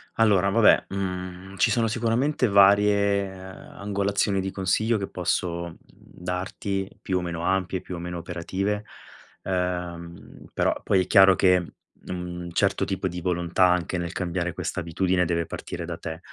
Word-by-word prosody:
Allora 100 -4 +4
vabbè, 110 +2 +5
mhmm, 95 0 -5
ci - - +3
sono 115 -2 +2
sicuramente 120 +5 +1
varie, 100 0 +4
uhm, 95 0 -11
angolazioni 100 0 0
di 95 0 -3
consiglio 110 +5 +1
che 100 -1 -3
posso, 85 -1 -1
mhmm, 80 - -14
darti. 95 +2 -5
Più 95 - -1
o - - -1
meno 85 -1 -4
ampie, 95 -1 0
più 90 - -7
o - - -6
meno 90 0 -5
operative. 95 +5 -3 0.6
Ehm, 90 -2 -4
però - - +2
poi 95 -1 +3
è - - -10
chiaro 95 -2 +7
che 90 -2 +3 0.4
un 90 -1 -5
certo 100 +2 +1
tipo 95 -1 -2
di 90 -1 -5
volontà, 85 +1 +1
anche 90 0 0
nel 85 -1 -3
cambiare 90 -1 -2
questa - - -3
abitudine, 90 +2 +1
deve 85 0 0
partire 85 +1 -6
da 85 -1 -5
te. 80 -1 -6
95 Hz, 160 wpm, -25 LUFS, 90-100 Hz, 0.6 s, chiaro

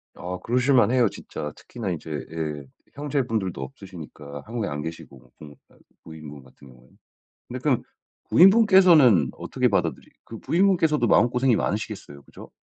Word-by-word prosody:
아 90 +1 -6
그러실 125 +3 +1
만해요 125 -1 +4
진짜. 75 -5 -8
특히나 110 -6 -7
이제 80 -1 -6 0.2
예 75 -3 -5 0.3
형제분들도 120 - -2
없으시니까 75 -1 -10
한국에 115 -2 -4
안 75 0 -5
계시고 70 -6 -10
그러니까, 75 -1 -16 0.3
부인분 75 -3 -11
같은 65 +1 -18
경우에. 65 0 -19 0.6
근데 - - -6
그럼 - - 0 0.5
부인분께서는 180 - +6
어떻게 - - -1
받아들이 - - -1 0.2
그 115 - -10
부인분께서도 165 -7 +2
마음고생이 125 +2 +3
많으시겠어요, 100 -8 -4
그죠? - - -14
100 Hz, 385 characters per minute, -24 LUFS, -, 0.6 s, 부인분께서는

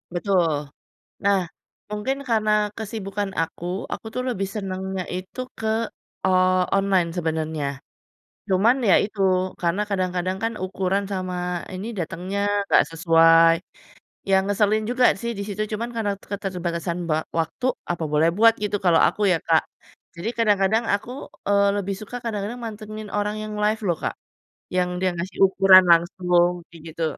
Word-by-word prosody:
Betul. 175 -4 +2 0.7
Nah, 200 -1 +4 0.5
mungkin 210 +6 -2
karena 215 -2 +2 0.3
kesibukan 205 -2 -4
aku, 165 +1 -4 0.3
aku - - -5
tuh 250 - -1
lebih 195 -5 -2
senengnya 190 -1 -3
itu 185 +7 -7 0.2
ke 220 - -4 0.6
o - - +3 0.5
online 195 -3 +2
sebenarnya. 160 -2 -2 0.9
Cuman 215 +7 +4
ya 185 - +7
itu, 205 -1 -7 0.4
karena 170 +4 +1
kadang-kadang 185 -1 -1
kan 225 0 0
ukuran 190 +1 -1
sama 185 -1 -3 0.4
ini 190 +3 -5
datengnya 185 +4 -3 0.3
nggak - - +5
sesuai. 165 0 +5 0.8
Ya 190 - +5
ngeselin 210 +1 +2
juga 250 0 +3 0.2
sih 235 0 -2
di 200 - -3
situ, 205 0 -4
cuman 230 +3 -3
karena 215 -3 0 0.2
keterbatasan 180 -3 -3
ba 155 - +2 0.2
waktu, 165 +10 -3 0.3
apa 170 - -3
boleh 160 +2 +4
buat 225 +1 +7
gitu, 205 - 0
kalau 170 -2 +5
aku 210 - -3
ya, 170 - +3
Kak. 160 -1 +5 0.5
Jadi 180 +7 -3
kadang-kadang 210 0 +3
aku, 205 +4 -2 0.4
eee, 200 0 +4
lebih 195 0 -2
suka 215 +4 -8
kadang-kadang 215 +1 -3
mantengin 215 -1 -7
orang 210 +1 -1
yang 215 - -6
live 215 +2 +1
loh, 170 - +1
Kak, - - -2 0.6
yang 180 0 +2
dia 185 0 +2
ngasih 185 +3 -5
ukuran 190 -1 +7
langsung, 175 +1 +3 0.2
kayak 165 -2 -14
gitu. 165 - -4
195 Hz, 145 wpm, -23 LUFS, 175-210 Hz, 0.9 s, ya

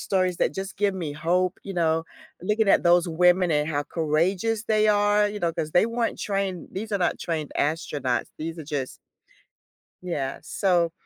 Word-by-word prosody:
stories 185 -2 0
that - - +1
just 195 +1 -5
give 200 -1 +1
me 165 -6 -4
hope, 180 +4 0
you 195 - -6
know, 165 -2 +1 0.4
looking 210 +2 +1
at - - +5
those 175 0 +4
women 180 +2 +3
and 150 -1 +2
how 145 -2 0
courageous 180 +8 0
they 215 -1 +2
are, 205 0 +3
you 205 0 -5
know, 170 -1 0
'cause 155 - -3
they 180 - +4
weren't 230 0 -2
trained, 195 -3 -2
these 210 +3 -6
are 200 - +1
not 175 - 0
trained 155 -3 -3
astronauts, 145 -4 -1
these 165 +2 -5
are 160 - -7
just 140 -3 -4 1.0
Yeah, 145 -7 -3
so 170 0 +1
180 Hz, 180 wpm, -25 LUFS, 160-200 Hz, 1.0 s, at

